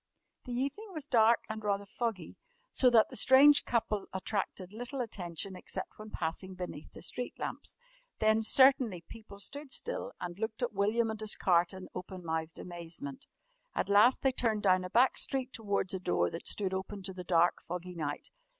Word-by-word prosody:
The 250 - -5
evening 280 - -3
was 310 -4 -5
dark 230 -4 +4
and 220 0 -5
rather 200 -1 0
foggy, 200 -5 -4 0.4
so 255 - +4
that 230 -3 +5
the - - -9
strange 275 +6 +7
couple 215 -3 0
attracted 190 -1 -3
little 245 +5 -5
attention, 190 -5 -4
except 190 +2 -6
when 215 0 -8
passing 185 +1 -3
beneath 180 -5 -7
the - - -11
street 245 - -3
lamps. - - -6 0.4
Then 220 0 +3
certainly 255 - +5
people 215 -3 -11
stood 285 +8 -5
still - - -3
and 175 +1 -6
looked 220 +2 -3
at 240 - -1
William 220 +3 +1
and 220 - -6
his 215 - 0
cart 175 -2 +3
in 190 -1 -8
open 180 0 -7
mouthed 160 0 -3
amazement. 180 - -7 0.5
At 195 - -1
last 210 +6 +5
they 265 - +4
turned 225 -4 0
down 185 -2 +4
a 180 - -5
back 245 +6 +4
street 260 -1 -2
towards 200 -4 -1
a 190 - -2
door 180 - +1
that 165 - -7
stood 190 -2 -1
open 190 +1 -4
to 190 0 -5
the 180 0 -7
dark, 175 -1 +3
foggy 180 +1 -6
night. 150 -4 -4
205 Hz, 185 wpm, -32 LUFS, 185-240 Hz, 0.5 s, strange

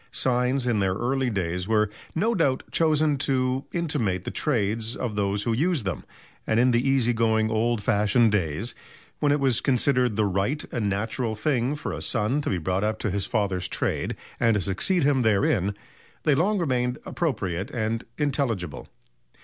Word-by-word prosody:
Signs 125 +1 +1
in 120 -4 +1
their 95 -1 +1
early 130 +3 0
days 90 -3 -2
were, 105 -1 +3 0.3
no 220 +8 +2
doubt, 140 - +1
chosen 155 -3 +2
to 130 0 0
intimate 135 - -1
the - - -4
trades 115 -3 0
of 115 -4 -3
those 100 0 0
who 115 - 0
used 150 - +1
them, 95 - -3 0.4
and 110 - +2
in 125 +1 +4
the 120 0 +3
easy 125 -3 +3
going 110 -1 +2
old 110 0 0
fashioned 105 +3 +3
days 100 +4 -1 0.5
when 145 -1 +2
it 145 - +2
was 130 -4 +2
considered 125 -3 +2
the 110 0 +2
right 100 +10 -1
and 105 -4 -1
natural 110 +3 -2
thing 130 +3 0
for 150 - -5
a - - -5
son 120 +5 0
to - - -2
be 95 - 0
brought 95 +4 -1
up 110 0 0
to 110 - -2
his 100 0 -2
father's 100 -5 -1
trade - - -2 0.2
and 115 -2 +3
to 105 - +1
succeed 150 - +1
him 140 -2 +3
therein, 100 -3 +2 0.5
they 150 - +4
long 190 +9 +2
remained 125 -7 0
appropriate 100 - -2
and 115 0 -2
intelligible. 125 - -2
115 Hz, 175 wpm, -25 LUFS, 105-135 Hz, 0.5 s, in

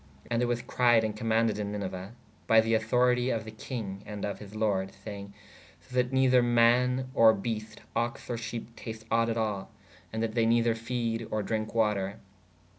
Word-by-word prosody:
And 115 0 +2
it 125 - +2
was 120 0 -1
cried 120 -2 +3
ād 110 -1 -2
commaunded 110 -1 +1
in 100 -1 -2
Niniue 95 0 -5 0.3
by 110 - +6
[the] 115 +1 +2
auctorite 125 +3 +2
of 110 -2 -2
[the] 110 - -7
kinge 105 -3 -6
ād 105 -1 -4
of 100 - -4
his 105 0 -11
lordes 100 -3 0
sayenge: 100 -2 -7 0.5
se 130 - -18
that 125 0 +1
nether 130 -1 +4
mā 120 +2 +3
or 110 -1 +6
beest/ 110 0 -5
oxe 120 0 -2
or 120 - -2
shepe 115 0 -6
tast 110 -1 -8
ought 115 +1 +3
at 115 - -1
al/ 105 -4 -2 0.2
& 90 -1 -26
that 110 0 -2
they 115 -1 +2
nether 115 0 +3
fede 115 -1 -2
or 110 -1 -1
drinke 110 +1 -3
water. 105 -3 +1
115 Hz, 190 wpm, -29 LUFS, 105-120 Hz, 0.5 s, by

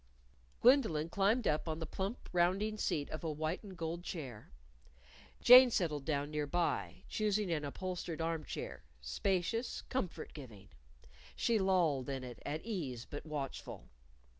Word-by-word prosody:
Gwendolyn 220 - +4
climbed 205 +6 +2
upon 155 +1 0
the 165 - -4
plump 195 +8 -4
rounding 190 +5 +2
seat 150 -8 -1
of 155 - -5
a 160 - -1
white 155 +3 -2
and 195 -4 -10
gold 170 +1 -3
chair. 135 - -7 0.9
Jane 250 +1 +10
settled 155 - -1
down 145 -1 -1
nearby, 150 +3 -1
choosing 210 -3 0
an 155 -3 0
upholstered 175 +2 -4
arm 165 -1 -1
chair 65 - -6 0.2
spacious, 190 - -1
comfort 225 -9 -3
giving. 110 -9 -11 0.7
She 230 -2 +2
lolled 170 -9 +2
in 135 -1 -3
it, 125 -1 -8
at 155 +5 -4
ease 145 - -4
but 145 +2 -7
watchful. 140 - -5
165 Hz, 140 wpm, -35 LUFS, 145-195 Hz, 0.9 s, Jane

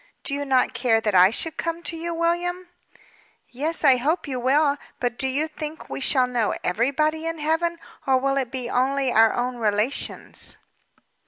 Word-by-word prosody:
"Do - - -2
you 285 0 -2
not 260 -2 +2
care 235 -3 +2
that 215 -2 -1
I 185 0 +7
should 315 +9 0
come 335 0 -3
to 335 - -3
you, 335 +1 -4
William?" 350 +2 -1 0.8
"Yes, 305 +7 -2
I 270 -3 +6
hope 305 +7 -1
you 260 -3 -3
will. 285 +3 +2 0.2
But 245 -1 -1
do 265 - -1
you 285 +4 0
think 310 0 -8
we - - -4
shall 260 -1 +3
know 245 -3 -1
everybody 305 - 0
in 330 0 -3
Heaven? 325 +3 0 0.3
Or 265 -1 +4
will 275 +1 0
it 260 -3 -1
be 255 -2 -4
only 265 +1 +1
our 225 -1 +5
own 245 0 -2
relations?" 215 +3 -2
275 Hz, 180 wpm, -23 LUFS, 245-320 Hz, 0.8 s, I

